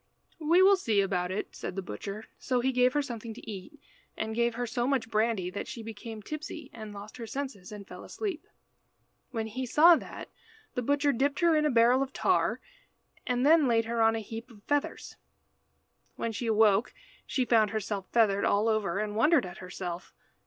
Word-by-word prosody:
"We 335 Hz, +4 st, +4 dB
will 395 Hz, +1 st, +7 dB
see 225 Hz, -, +1 dB
about 180 Hz, -2 st, 0 dB
it," 190 Hz, -, -4 dB
said -, -, -5 dB
the 195 Hz, -, -3 dB
butcher. 200 Hz, -, -6 dB
So 255 Hz, -2 st, 0 dB
he 260 Hz, +2 st, +1 dB
gave 250 Hz, 0 st, +3 dB
her 295 Hz, -1 st, +1 dB
something 230 Hz, -3 st, -6 dB
to -, -, -12 dB
eat, 210 Hz, +8 st, -8 dB, 0.4 s
and 220 Hz, -, -3 dB
gave 235 Hz, 0 st, +1 dB
her 245 Hz, +1 st, -2 dB
so 240 Hz, +1 st, -1 dB
much 260 Hz, -5 st, 0 dB
brandy 215 Hz, -4 st, +1 dB
that 200 Hz, -, -5 dB
she 235 Hz, -2 st, -7 dB
became 220 Hz, 0 st, -8 dB
tipsy 305 Hz, +2 st, -7 dB
and 215 Hz, -2 st, -8 dB
lost 205 Hz, +2 st, -10 dB
her 230 Hz, -2 st, -6 dB
senses, 255 Hz, -7 st, -5 dB
and 205 Hz, -2 st, -9 dB
fell -, -, -10 dB
asleep. 390 Hz, -7 st, -5 dB, 0.8 s
When 225 Hz, -3 st, -3 dB
he 255 Hz, +4 st, -4 dB
saw 330 Hz, +7 st, +7 dB
that, -, -, -8 dB, 0.4 s
the 250 Hz, -, -1 dB
butcher 285 Hz, +3 st, +2 dB
dipped 280 Hz, +6 st, 0 dB
her 340 Hz, -2 st, +5 dB
in 305 Hz, 0 st, +3 dB
a -, -, +2 dB
barrel 245 Hz, +1 st, +4 dB
of 270 Hz, 0 st, -3 dB
tar, -, -, +1 dB, 0.7 s
and 250 Hz, +1 st, +1 dB
then 310 Hz, -1 st, +6 dB
laid 230 Hz, -2 st, +2 dB
her 230 Hz, 0 st, -1 dB
on 225 Hz, 0 st, +4 dB
a 225 Hz, -, -2 dB
heap 225 Hz, +3 st, -8 dB
of 210 Hz, -4 st, -17 dB
feathers. 290 Hz, 0 st, -2 dB, 1.0 s
When 230 Hz, -, -2 dB
she 230 Hz, +2 st, -4 dB
awoke 215 Hz, 0 st, +3 dB, 0.3 s
she 255 Hz, -, 0 dB
found 225 Hz, -3 st, +4 dB
herself 205 Hz, -2 st, -3 dB
feathered 205 Hz, -4 st, +3 dB
all 205 Hz, +2 st, +2 dB
over, 215 Hz, -5 st, 0 dB
and 210 Hz, 0 st, -2 dB
wondered 280 Hz, -, +4 dB
at 180 Hz, 0 st, -9 dB
herself. 180 Hz, -1 st, -6 dB
230 Hz, 195 wpm, -29 LUFS, 210-265 Hz, 1.0 s, will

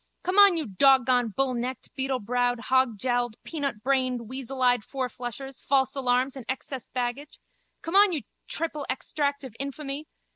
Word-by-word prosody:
Come 370 Hz, +3 st, +2 dB
on, 400 Hz, -4 st, +8 dB
you 315 Hz, -, -2 dB
dog 260 Hz, +6 st, +4 dB
gone, 245 Hz, -1 st, +3 dB
bullnecked, 255 Hz, -1 st, -1 dB
beetlebrowed, 245 Hz, -2 st, 0 dB
hogjowled, 245 Hz, -2 st, +2 dB
peanutbrained, 260 Hz, -3 st, -1 dB
weaseleyed 250 Hz, 0 st, 0 dB
fourflushers, 255 Hz, 0 st, -5 dB
false 265 Hz, -1 st, +2 dB
alarms 255 Hz, 0 st, +1 dB
and 265 Hz, -, -7 dB
excess 265 Hz, -1 st, -5 dB
baggage! 250 Hz, +4 st, -4 dB, 0.4 s
Come 330 Hz, +3 st, -3 dB
on, 405 Hz, 0 st, +7 dB
you 310 Hz, -5 st, -2 dB, 0.2 s
triple 305 Hz, -3 st, -3 dB
extract 285 Hz, +1 st, -1 dB
of 255 Hz, -5 st, -9 dB
infamy! 280 Hz, +2 st, -4 dB
265 Hz, 135 wpm, -27 LUFS, 245-280 Hz, 0.4 s, on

